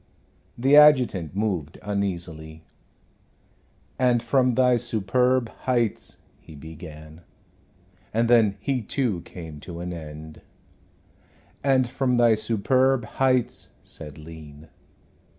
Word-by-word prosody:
The 135 +4 +4
adjutant 125 - +5
moved 95 -8 -2
uneasily. 85 -6 -4 1.4
"And 125 -2 +2
from 125 0 +2
Thy 125 -1 +4
superb 120 +2 +1 0.2
heights 120 -4 0
" - - -36
he 80 - -14
began, 80 +1 -11 0.9
and 115 +2 +1
then 110 -4 +4
he 130 +4 -1
too 110 -5 -2
came 80 -4 -9
to 85 +3 -9
an 90 +1 -5
end. 80 -1 -9 1.2
"And 130 -2 +3
from 125 0 0
Thy 120 -1 +5
superb 120 +4 +1
heights," 130 +1 0
said 75 -3 -9
Lean. 75 -1 -12
105 Hz, 105 wpm, -24 LUFS, 80-125 Hz, 1.4 s, adjutant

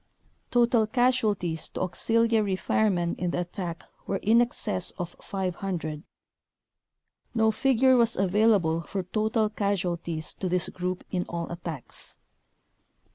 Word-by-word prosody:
Total 235 -2 +3
casualties 215 -9 +1
to - - -5
auxil 225 +6 +2
iary 210 -4 +2
firemen 180 -3 +1
in 180 - 0
the 175 - -1
attack 175 -2 -5 0.2
were 195 - 0
in 225 +3 +5
excess 235 - -1
of 175 -1 -5
500. 180 -5 -3 1.3
No 220 -1 +4
figure 260 +2 +4
was 235 -1 +3
available 190 -4 +3
for 190 +3 -4
total 215 +4 +1
casualties 175 -6 -1
to 185 - -3
this 180 0 +1
group 180 0 -3
in 180 -1 0
all 170 0 -4
attacks. 170 -6 -7
190 Hz, 125 wpm, -27 LUFS, 175-220 Hz, 1.3 s, in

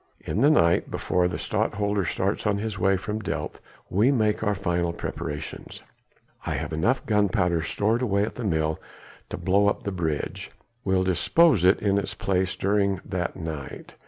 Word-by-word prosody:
In 105 - -2
the 145 - +6
night 85 - +3
before 90 -1 0
the 90 - -3
Stadtholder 100 -1 -1
starts 95 +6 -1
on 100 -1 +2
his 105 -1 -4
way 95 +1 +3
from 105 +3 -4
Delft - - -4 0.3
we 110 +8 +3
make 110 -5 +1
our 105 -1 +1
final 85 -3 -1
preparations. 75 -3 -6 0.6
I - - -2
have - - -4
enough 115 +12 +1
gunpowder 90 -5 +2
stowed 105 +8 0
away 100 -5 +1
at 105 - -3
the 125 - -6
mill 80 -5 0 0.5
to - - -5
blow 100 +2 +2
up 100 - 0
the 100 - -3
bridge. 80 -5 -3 0.3
We'll 95 -1 +2
dispose 95 - +3
it 95 +2 +5
in 100 -1 +3
its 100 - -4
place 95 -1 0
during 100 -1 +1
that 90 -3 -3
night. 80 -5 -7
95 Hz, 170 wpm, -25 LUFS, 90-105 Hz, 0.6 s, the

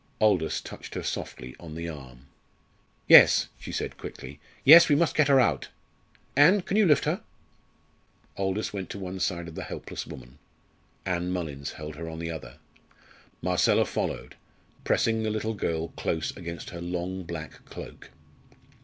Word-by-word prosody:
Aldous 95 -7 +2
touched - - -10
her - - -3
softly 65 +1 -5
on 80 -3 -9
the 85 +1 -4
arm. 65 -5 -10 0.8
"Yes," - - +8
she - - -8
said - - -4
quickly, 75 - -9 0.2
"yes, 165 +4 +9
we 145 - +5
must 165 +2 +2
get 150 -2 +3
her 140 -2 +6
out. 90 - +2 0.7
Ann, 170 +9 +6
can 195 - -2
you 215 -2 +5
lift 150 -4 +4
her?" - - -1 1.1
Aldous 95 +2 -2
went 95 -2 -5
to - - -6
one 95 -1 -6
side 85 -2 -1
of 85 - -9
the - - -6
helpless - - -6
woman: 65 +2 -11 0.7
Ann 90 -1 -1
Mullins 75 -6 -4
held 75 0 -8
her 80 0 -6
on 80 - -7
the 85 0 -4
other. 65 -7 -8 0.9
Marcella - - +3
followed, - - -4 0.5
pressing 115 -1 +2
the 110 - -1
little 110 +1 -2
girl 85 -5 -2
close 80 +1 -3
against 85 -3 -7
her 85 -1 -7
long 90 +2 -3
black 80 -2 -8
cloak. - - -10
85 Hz, 160 wpm, -27 LUFS, 80-110 Hz, 1.1 s, yes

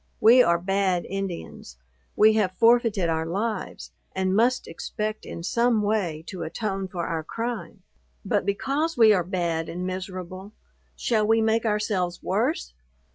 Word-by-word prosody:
We 240 +4 +7
are 170 -7 +4
bad 185 0 0
Indians. 185 - -6 0.4
We 215 +1 +6
have 190 -4 0
forfeited 230 -5 +4
our 160 0 -1
lives, 205 +4 -3 0.2
and 190 0 0
must 245 +4 +2
expect 215 +5 -5
in 170 - -7
some 235 +3 +2
way 190 -7 -1
to 185 -1 -7
atone 195 +3 -3
for 175 -2 -4
our 160 -1 -2
crime: 215 -2 -5 0.4
but, 205 +1 +1
because 280 - -1
we 220 -2 +7
are 180 -3 +2
bad 170 -2 -2
and 180 +2 -4
miserable, 185 +1 -6 0.4
shall 215 -3 +1
we 225 +1 +4
make 225 +1 +1
ourselves 205 -4 -1
worse? - - -1
195 Hz, 145 wpm, -25 LUFS, 175-220 Hz, 0.4 s, We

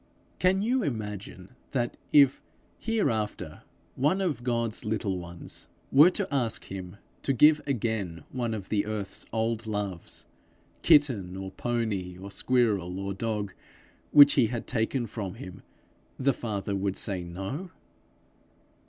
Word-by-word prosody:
Can 190 +2 +3
you 250 +4 +2
imagine 105 - -5 0.2
that, 120 -3 0 0.2
if, 140 -2 +6 0.4
here 225 - +1
after, 105 -7 -4 0.3
one 150 +9 +2
of 170 -10 -1
God's 115 -2 -1
little 105 -4 -1
ones 85 -1 -8 0.2
were 150 +6 +8
to 190 +1 -2
ask 120 -5 0
him 95 0 -7 0.2
to 135 - +1
give 150 +4 +6
again 110 -9 -2
one 120 -3 -1
of 100 -3 -7
the 105 -1 +1
earth's 105 -3 -4
old 115 0 -1
loves 100 -5 -4 0.6
kitten, 125 - +4
or 95 0 -5
pony, 105 -7 -2
or 100 +1 -8
squirrel, 100 -6 +1
or 100 0 -3
dog, 105 -1 -2 0.6
which 145 -1 +9
he 125 -5 +4
had 120 0 -4
taken 120 +1 0
from 100 -3 -5
him, 95 -6 -9 0.6
the 135 +1 +2
Father 105 -4 -3
would 95 0 -1
say 95 -3 -2
no? 95 - -5
110 Hz, 135 wpm, -28 LUFS, 95-130 Hz, 0.6 s, which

